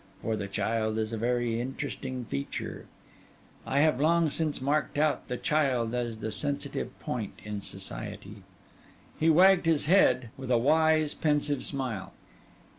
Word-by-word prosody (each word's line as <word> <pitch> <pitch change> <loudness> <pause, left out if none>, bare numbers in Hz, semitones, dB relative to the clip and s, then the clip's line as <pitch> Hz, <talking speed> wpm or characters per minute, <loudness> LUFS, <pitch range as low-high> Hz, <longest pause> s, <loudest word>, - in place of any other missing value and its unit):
For 110 - 0
the 100 -2 -4
child 110 +2 -1
is 110 0 -2
a - - -1
very 120 0 0
interesting 130 -1 -5
feature: 70 -8 -5 0.8
I 140 +2 +2
have 150 -4 +3
long 165 0 +3
since 155 -1 -1
marked 145 +3 0
out 150 0 +1
the 125 - -3
child 130 -7 +1
as 120 -2 -2
the 110 0 -4
sensitive 140 +7 -4
point - - -4
in 105 -1 -5
society.' 105 +1 -8 0.8
He 160 - +4
wagged 180 +2 +6
his 160 -3 +2
head, 145 - +4
with 130 -1 -7
a 125 - +4
wise, 155 +3 +3
pensive 150 -2 0
smile. 130 -8 -4
130 Hz, 145 wpm, -29 LUFS, 110-150 Hz, 0.8 s, wagged